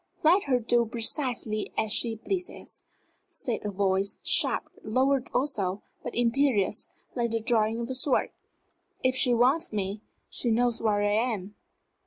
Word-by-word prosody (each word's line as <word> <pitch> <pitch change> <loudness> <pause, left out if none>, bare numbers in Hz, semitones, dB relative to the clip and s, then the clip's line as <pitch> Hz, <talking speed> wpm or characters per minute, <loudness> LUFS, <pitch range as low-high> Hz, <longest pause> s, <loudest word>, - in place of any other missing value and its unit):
"Let 350 +6 +4
her 265 -3 +2
do 240 +1 +2
precisely 230 -2 -2
as 220 -1 +1
she 225 +1 +3
pleases," 360 - -5 0.5
said 275 -10 -4
a 210 - -2
voice, 195 0 0
sharp, - - +3 0.2
lowered 260 +3 +1
also, 205 -8 -1 0.2
but - - -6
imperious, 235 -4 +1 0.3
like 235 -2 -1
the 230 0 -1
drawing 225 0 +1
of 235 - -3
a 260 - -3
sword. 260 +1 +1 0.7
"If 255 0 +2
she 250 -1 +4
wants 265 +8 +2
me, 205 0 -3 0.3
she 240 - -3
knows 235 +1 +1
where 210 -2 +1
I 205 - +2
am." 210 -3 -1
235 Hz, 150 wpm, -27 LUFS, 215-255 Hz, 0.7 s, Let